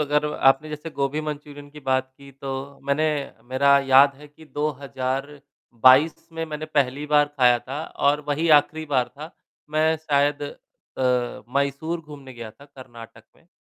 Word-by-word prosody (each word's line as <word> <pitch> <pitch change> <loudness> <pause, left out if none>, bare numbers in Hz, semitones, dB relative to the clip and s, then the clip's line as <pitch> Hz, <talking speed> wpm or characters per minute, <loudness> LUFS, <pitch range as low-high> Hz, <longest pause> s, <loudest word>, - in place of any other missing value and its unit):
अगर 150 0 +1
आपने 135 +3 +3
जैसे 150 +2 -7
गोभी 140 +1 -2
मंचूरियन 145 -1 -7
की 150 0 -12
बात 130 -1 0
की, 140 0 -14
तो 135 +1 -7
मैंने 140 +3 +1 0.5
मेरा 140 +2 +4
याद 135 +1 +6
है 150 +2 -13
कि 155 +2 -17
2022 140 -1 0
में 165 0 -3
मैंने 155 0 -5
पहली 145 -1 0
बार 150 0 +4
खाया 125 -2 +5
था 135 +5 -6 0.2
और 145 +1 +3
वही 155 +3 0
आखिरी 155 +2 0
बार 130 -4 +1
था। 150 +3 -10 0.4
मैं 155 +1 +2
शायद 145 -2 0
अ, 125 -3 -3
मैसूर 140 +5 -1
घूमने 145 -4 -12
गया 115 -2 -8
था, 115 +6 -18
कर्नाटक 120 -5 -13
में। - - -27
140 Hz, 155 wpm, -23 LUFS, 135-150 Hz, 0.5 s, याद